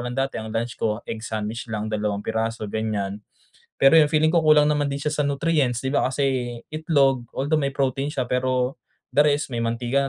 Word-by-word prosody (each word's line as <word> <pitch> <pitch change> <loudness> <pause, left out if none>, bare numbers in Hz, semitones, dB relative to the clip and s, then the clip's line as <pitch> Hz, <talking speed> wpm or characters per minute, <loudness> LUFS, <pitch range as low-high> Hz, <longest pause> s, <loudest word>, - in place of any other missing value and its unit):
lang 120 +1 -4
dati 135 0 -1
ang 110 - -7
lunch 115 +2 -2
ko 105 -1 0
egg 115 - -5
sandwich 110 +1 -4
lang, 110 -1 -3
dalawang 105 -1 -1
piraso 110 0 -2
ganyan. 105 -2 -3 0.6
Pero 135 +3 +6
yung 155 -2 +6
feeling 155 0 +3
ko 170 - +4
kulang 150 -1 +5
naman 145 -1 +1
din 140 - -3
siya 150 +1 -1
sa 150 - +1
nutrients 140 -4 +1
'di 130 +1 -3
ba - - +2
kasi 130 -3 -1 0.2
itlog, 140 -6 +2
although 145 +4 0
may 140 -1 0
protein 135 +1 -1
siya 130 -4 -2
pero, 125 0 0 0.4
the 145 - +6
rest 145 0 +1
may 115 - -1
mantika 120 +4 0
130 Hz, 200 wpm, -23 LUFS, 115-145 Hz, 0.6 s, Pero